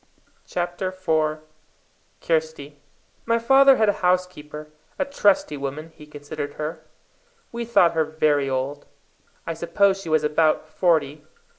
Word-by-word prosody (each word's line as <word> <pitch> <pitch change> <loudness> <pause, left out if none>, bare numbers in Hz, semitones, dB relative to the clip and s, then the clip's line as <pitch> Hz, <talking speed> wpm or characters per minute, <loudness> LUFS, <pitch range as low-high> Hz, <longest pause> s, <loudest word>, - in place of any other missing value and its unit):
CHAPTER 175 +1 -3
IV 160 -4 -1 0.8
Kirsty 155 -3 -2 0.5
My 230 - +3
father 270 +3 +6
had 220 - +2
a 205 - +3
housekeeper, 180 -5 -2 0.3
a 280 - 0
trusty 205 - +1
woman, 140 +4 -6
he 150 -1 -14
considered 145 0 -7
her. 155 +1 -5 0.7
We 235 0 -4
thought 185 -7 +4
her 160 -1 +1
very 150 -3 +1
old. 135 +2 -3 0.6
I 165 - -3
suppose 195 +4 +1
she 170 - -8
was 155 -1 +2
about 155 +1 +1
forty. 155 -4 0
160 Hz, 130 wpm, -23 LUFS, 150-185 Hz, 0.8 s, father